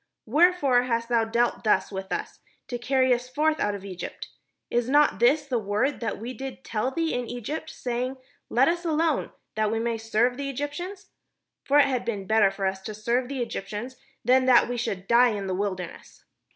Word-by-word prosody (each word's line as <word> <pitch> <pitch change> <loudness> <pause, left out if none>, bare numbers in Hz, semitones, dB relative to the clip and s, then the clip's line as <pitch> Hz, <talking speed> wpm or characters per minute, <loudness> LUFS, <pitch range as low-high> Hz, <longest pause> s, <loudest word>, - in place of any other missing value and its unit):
wherefore 290 -1 +4
hast 230 -1 -1
thou 235 -2 +3
dealt 235 +2 0
thus 215 - +2
with 190 -1 -6
us, - - -4 0.3
to 245 - -4
carry 260 +1 +3
us 245 +1 -3
forth 310 +3 +1
out 205 0 0
of 200 -1 -8
Egypt? 185 -2 -7 0.4
Is 240 +1 +1
not 290 +2 +4
this 280 +6 +4
the 255 -4 0
word 210 +7 0
that 225 -3 -3
we 235 +4 -6
did 265 0 -7
tell 220 +3 -1
thee 325 +4 -1
in 245 -1 -2
Eg>^t, 280 +7 -5
sa>'ing, 250 0 -3 0.3
'Let 255 +3 +4
us 345 +1 0
alone, 320 -2 0 0.2
that 215 -1 +1
we 225 - 0
may 230 0 -1
serve 225 +3 +1
the 280 0 -3
Eg}^tians'? 350 +9 -5 0.5
For 285 - +3
it 290 - +7
had 255 -3 -1
been 210 -5 -3
better 220 -1 +4
for 195 0 -4
us 190 0 -1
to 210 +2 -6
serve 235 +4 0
the 270 -3 -2
Egyptians, 235 +3 -6 0.3
than 255 +2 +4
that 245 -2 +6
we 245 - -3
should 195 -5 -3
die 240 0 +5
in 200 - -4
the 190 - -2
wilderness." 185 -3 -5
245 Hz, 200 wpm, -26 LUFS, 215-275 Hz, 0.5 s, it